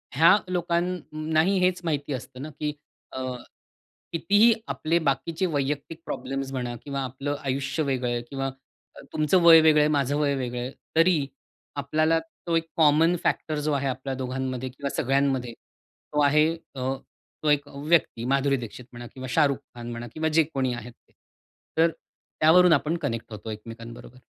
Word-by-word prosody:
ह्या 165 +8 +7
लोकांनाही 170 -1 0
हेच 180 0 +2
माहिती 145 -3 -2
असतं 125 0 -7
ना 155 - -5
की 150 -1 -1 0.4
अ, 130 - -5 0.9
कितीही 205 +7 +5
आपले 165 +2 0
बाकीचे 160 +4 0
वैयक्तिक 145 0 -2
प्रॉब्लेम्स 135 0 -4
म्हणा 125 -2 -3
किंवा 140 -1 -3
आपलं 135 +3 -3
आयुष्य 140 +4 -1
वेगळं 130 -3 -1
आहे 120 - -1
किंवा 135 -1 -2 0.5
अ, - - -11
तुमचं 155 +4 +3
वय 165 -1 +9
वेगळं 155 -1 +5
आहे, 150 - +4
माझं 145 -2 +1
वय 140 -2 +2
वेगळं 125 -2 -3
आहे, 125 - -4 0.2
तरी 165 -3 +4 0.5
आपल्याला 155 +3 +1 0.3
तो 170 - +1
एक 165 0 -2
कॉमन 160 +2 +5
फॅक्टर 155 -1 0
जो 150 +1 -1
आहे 140 0 0
आपल्या 130 +1 -3
दोघांमध्ये 130 0 -3
किंवा 140 +2 -5
सगळ्यांमध्ये, 135 -2 +1 0.6
तो 150 - +2
आहे, 150 +2 +4 0.3
अ, 130 - -5 0.6
तो 150 - +2
एक 145 0 +2
व्यक्ती. 140 -5 +1
माधुरी 140 +1 +2
दीक्षित 120 0 -8
म्हणा 120 0 -9
किंवा 130 0 -7
शाहरुख 145 -4 +3 0.2
खान 120 0 -7
म्हणा 120 0 -6
किंवा 160 0 0
जे 160 0 +5
कोणी 130 -2 0
आहेत 120 0 -8
ते. - - -31 0.7
तर 165 +1 +4
त्यावरून 165 +2 +3
आपण 155 +3 +1
कनेक्ट 115 -8 -4
होतो 105 +1 -7
एकमेकांबरोबर. 115 +3 -10
145 Hz, 160 wpm, -26 LUFS, 130-160 Hz, 0.9 s, वय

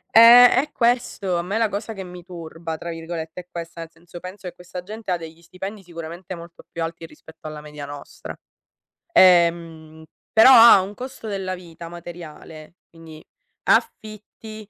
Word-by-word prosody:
Eh, 235 +2 +10
è 285 +4 0
questo. 235 -8 0
A - - -1
me 190 +5 -3
la 225 -1 +1
cosa 210 +3 -5
che 195 - -7
mi 180 -1 -11
"turba" 165 -2 -8
tra 170 +1 -6
virgolette 165 +1 -7
è 180 - -24
questa. 170 -1 -8
Nel 165 - -8
senso, 170 +1 -13
penso 185 +2 -9
che 180 - -7
questa 180 0 -9
gente 215 +2 -9
ha 175 - +1
degli 165 0 -11
stipendi 195 +4 -8
sicuramente 170 +1 -9
molto 170 0 -13
più 165 - -4
alti 165 0 -6
rispetto 160 0 -14
alla 155 -1 -8
media 150 -1 -9
nostra. 145 0 -9 0.8
Ehm, 170 - +3 0.3
però 225 +3 +8
ha 230 -5 +9
un 195 +2 -7
costo 250 -1 -9
della 190 -2 -3
vita 170 -1 -11
materiale, 165 -2 -11 0.2
quindi 160 -2 -14 0.4
affitti, 215 0 -2
175 Hz, 165 wpm, -22 LUFS, 165-200 Hz, 0.8 s, Eh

